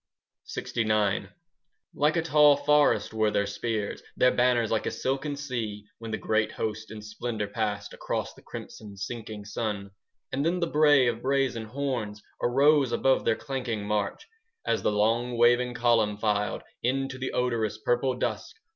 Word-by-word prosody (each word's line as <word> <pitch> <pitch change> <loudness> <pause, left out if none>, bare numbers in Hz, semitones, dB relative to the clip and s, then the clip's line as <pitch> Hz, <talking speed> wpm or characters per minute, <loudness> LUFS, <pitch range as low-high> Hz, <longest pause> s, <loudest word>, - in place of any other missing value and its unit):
LXIX 105 -4 0 0.7
Like 150 +3 +2
a 165 - +1
tall 150 -2 +6
forest 145 -4 +3
were 110 -1 +2
their 100 -1 +1
spears, 105 +1 -3 0.2
Their 125 - +5
banners 120 -2 +2
like 110 -2 0
a - - +2
silken 135 +3 -2
sea, 115 -7 -4
When 115 -1 -7
the 110 - -2
great 110 0 0
host 110 0 -4
in 105 -1 -8
splendour 110 0 -4
passed 105 -1 -3
Across - - -3
the - - -17
crimson 105 -2 -9
sinking 105 0 -6
sun. 100 -2 -3 0.4
And 135 +2 -1
then 170 +3 +1
the 170 - +1
bray 150 -4 +5
of 120 -1 0
brazen 130 -4 0
horns 120 -4 -3 0.2
5 - - +2
Arose 140 0 +4
above 135 +2 +2
their 115 - +3
clanking 125 -7 -4
march, 105 -1 -2 0.4
As - - +1
the - - +1
long 115 +4 +1
waving 120 +1 +4
column 115 -4 +2
filed 105 -1 0 0.2
Into 135 +1 -1
the 130 - -3
odorous 115 -4 0
purple 120 +3 +1
dusk. 125 - -3
115 Hz, 160 wpm, -27 LUFS, 105-135 Hz, 0.7 s, tall